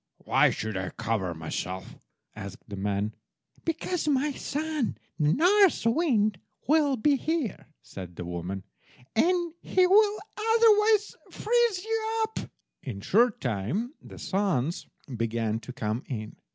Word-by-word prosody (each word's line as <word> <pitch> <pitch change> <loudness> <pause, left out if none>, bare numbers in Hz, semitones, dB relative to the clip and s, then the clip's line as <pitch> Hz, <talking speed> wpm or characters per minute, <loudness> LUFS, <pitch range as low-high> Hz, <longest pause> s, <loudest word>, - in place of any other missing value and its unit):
"Why - - +5
should 110 -1 -3
I 95 -1 -2
cover 95 -6 -2
myself?" 90 +4 -5 0.4
asked 100 0 -9
the 100 - -6
man. 100 +2 -1 0.5
"Because, 330 +1 -2
my 290 0 +2
son, 300 -1 -2 0.2
the 150 -1 +3
North 370 - +4
wind, 230 - +2 0.3
will 290 -2 +3
be 280 +6 +3
here," 310 - -2 0.2
said 90 -3 -9
the 90 - -6
woman, 90 +2 -4 0.5
"and 345 +5 +2
he 370 -1 +3
will 415 +2 +5 0.4
otherwise 430 -2 +4
freeze 465 -4 +1
you 450 0 -1
up." 440 0 -3 0.4
In 125 -8 -6
a 100 - -10
short 235 +2 +3
time 125 - -2
the - - -12
sons 180 -6 -1 0.3
began 115 -1 -1
to 125 - -9
come 110 -1 -2
in. 110 -5 -5
220 Hz, 135 wpm, -28 LUFS, -, 0.5 s, Why